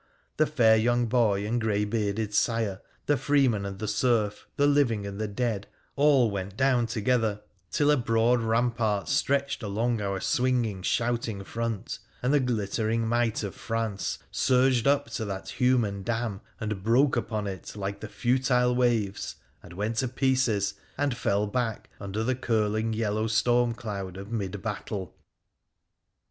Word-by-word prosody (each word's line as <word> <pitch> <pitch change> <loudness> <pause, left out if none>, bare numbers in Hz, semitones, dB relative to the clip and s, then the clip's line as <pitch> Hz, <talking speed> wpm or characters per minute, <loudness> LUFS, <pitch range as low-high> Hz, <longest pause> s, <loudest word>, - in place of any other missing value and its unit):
The 155 - +3
fair 115 -7 +4
young 120 +2 +2
boy 110 -4 +2
and 120 +3 -1
grey 105 -2 +1
bearded 105 0 -1
sire, 110 -3 0 0.2
the 145 - +2
freeman 130 -10 +2
and 95 -1 -6
the 110 - -4
serf, 105 -1 0
the 145 - +4
living 135 -8 +2
and 100 +1 -5
the 110 - -1
dead, 105 -1 -2 0.3
all 140 -6 +4
went 100 0 -5
down 130 -3 +3
together, 110 -1 0 0.3
till 145 - +3
a 150 - +4
broad 120 0 +2
rampart 115 -3 0
stretched 140 0 +1
along 110 +2 -1
our 100 -1 -2
swinging 120 -6 0
shouting 115 -1 -1
front, 115 0 -4 0.2
and 130 +3 +2
the 145 - +5
glittering 115 -2 0
might 120 -1 +1
of 100 - -4
France 115 -3 -3
surged 130 -1 +3
up 145 0 +2
to 110 - -3
that 95 -1 -5
human 120 -6 +1
dam 115 0 -2 0.2
and 105 -4 -3
broke 125 +7 +3
upon 110 -3 -2
it 95 +1 -6
like 100 -1 -4
the 110 - -7
futile 125 0 +2
waves, 115 -5 0 0.3
and 85 - -12
went 105 +5 -2
to 130 - +1
pieces, 130 -6 +1 0.2
and 140 -2 0
fell 105 -3 +1
back 115 +1 -3
under 100 +2 -3
the 130 +3 +1
curling 110 -3 0
yellow 110 0 0
stormcloud 110 -4 0
of 100 +3 -8
mid 100 -3 -3
battle. 105 -4 -4
115 Hz, 155 wpm, -27 LUFS, 105-125 Hz, 0.3 s, the